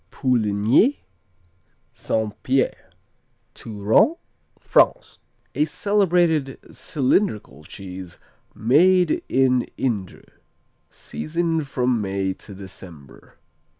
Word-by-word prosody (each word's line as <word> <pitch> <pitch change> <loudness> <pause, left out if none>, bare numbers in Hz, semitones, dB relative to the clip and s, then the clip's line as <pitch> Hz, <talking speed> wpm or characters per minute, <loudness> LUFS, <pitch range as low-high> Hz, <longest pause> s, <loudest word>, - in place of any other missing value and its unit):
Pouligny 120 - +2 0.9
St. 110 -2 -2
Pierre 130 +1 -1 0.6
Touraine, 110 - +1 0.4
France - - +2 0.3
A 150 - +1
celebrated 170 -6 +1
cylindrical 125 - -1
cheese 90 +1 -10 0.4
made 170 - +3
in 130 -1 +3 0.2
Indre. 105 -8 -3 0.7
Season 165 0 -3
from 125 -4 -1
May 95 -1 -2
to 100 +1 -13
December. 90 -7 -13
125 Hz, 75 wpm, -22 LUFS, 100-160 Hz, 0.9 s, made